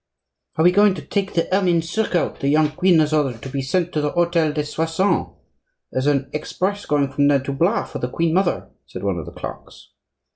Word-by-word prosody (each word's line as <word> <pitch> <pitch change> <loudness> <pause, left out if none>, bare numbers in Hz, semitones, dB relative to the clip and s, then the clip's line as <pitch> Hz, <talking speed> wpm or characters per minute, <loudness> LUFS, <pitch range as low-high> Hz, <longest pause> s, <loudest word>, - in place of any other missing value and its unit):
"Are 160 - +2
we 175 - +6
going 205 0 +4
to 155 - -7
take 195 +5 -2
the 165 - +1
ermine 175 -4 +2
surcoat 175 0 -1
the 140 - -2
young 150 +1 +3
queen 180 +2 +3
has 155 -1 +2
ordered 135 -7 0
to 135 - -6
be 135 +1 -3
sent 175 +6 -1
to 150 - 0
the 150 - 0
hotel 170 -1 +1
des 150 0 -2
Soissons? 160 +6 0 0.6
there's 130 +2 -1
an 140 -2 +1
express 190 +6 -3
going 140 -2 +1
from 140 +1 +2
there 140 -2 +3
to 140 - -3
Blois 170 +10 +1
for - - -7
the 125 - -3
queen 165 +4 0
mother," 185 0 0 0.2
said - - -8
one 95 -3 -1
of 75 - -8
the - - -7
clerks. - - -10
155 Hz, 220 wpm, -21 LUFS, 140-180 Hz, 0.6 s, we